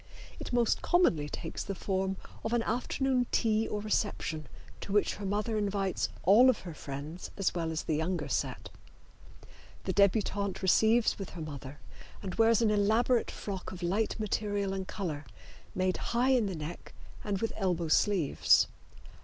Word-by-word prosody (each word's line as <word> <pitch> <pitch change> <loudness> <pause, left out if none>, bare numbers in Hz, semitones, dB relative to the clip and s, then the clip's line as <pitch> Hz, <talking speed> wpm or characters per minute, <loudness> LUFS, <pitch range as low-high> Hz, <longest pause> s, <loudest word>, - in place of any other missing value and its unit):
It - - -6
most 240 -2 +2
commonly 170 - +2
takes 165 - -5
the 195 - -4
form 190 0 -1 0.3
of 225 - -2
an 235 -1 +2
afternoon 250 +2 0
tea 220 -1 +2
or 210 - -3
reception 200 -7 -1 0.3
to - - -7
which 205 0 +2
her 200 -1 -4
mother 210 +2 0
invites 200 -2 -1
all 225 +8 +7
of 255 - +1
her 175 -3 -7
friends 150 +4 -7
as 195 - +1
well 165 -2 -2
as 160 -1 -2
the 155 - 0
younger 160 -1 -1
set. 135 - -2 1.1
The - - -2
debutante 200 -1 +1
receives 220 +5 +4
with 195 - -5
her - - -5
mother 145 -2 -7 0.4
and 190 -2 -4
wears 225 0 +4
an 215 - +3
elaborate 220 +4 +2
frock 195 -3 -6
of 180 -1 -8
light 205 +6 0
material 205 -2 -1
and 190 -1 -4
color, 160 -7 -4 0.5
made 185 0 +1
high 245 +3 +1
in 245 -5 +3
the 190 - -3
neck 155 +2 -7 0.3
and 205 -2 -1
with 225 - -2
elbow 180 -4 0
sleeves. 175 -2 +4
200 Hz, 160 wpm, -31 LUFS, 175-220 Hz, 1.1 s, all